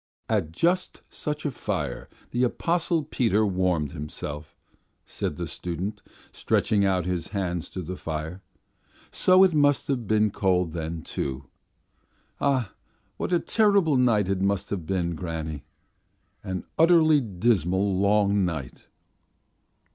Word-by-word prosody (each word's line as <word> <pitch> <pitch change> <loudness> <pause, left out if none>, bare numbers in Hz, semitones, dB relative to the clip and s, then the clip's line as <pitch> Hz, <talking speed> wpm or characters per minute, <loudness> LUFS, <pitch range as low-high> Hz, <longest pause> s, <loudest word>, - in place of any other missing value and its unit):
"At 100 -8 0
just 175 - 0
such 150 +1 -4
a 145 - 0
fire - - -4 0.2
the 120 - +1
Apostle 165 +5 +1
Peter 115 -7 +1
warmed 90 -6 0
himself," 75 0 -7 0.5
said - - -4
the - - -4
student, 90 +5 -5 0.3
stretching 105 -2 +1
out 95 -3 +1
his 90 -3 -2
hands 90 -5 -3
to 95 - -6
the 90 +3 -5
fire, 80 +3 -5 0.7
"so 185 +1 +5
it 185 -3 +4
must 145 -2 +3
have 125 -6 -1
been 110 0 +3
cold 90 -4 +1
then, 80 -1 -4
too. 65 0 -4 0.9
Ah, 130 -7 +1 0.4
what - - -3
a 175 - +4
terrible 200 -9 +3
night 115 -6 +3
it 95 -1 -1
must 100 0 0
have 90 -6 -3
been, 90 -3 0
granny! 80 -4 -5 0.8
An 95 -1 -4 0.2
utterly 160 -3 +6
dismal 95 - +1
long 100 +1 +3
night!" 80 -8 -4
100 Hz, 130 wpm, -26 LUFS, 85-125 Hz, 0.9 s, utterly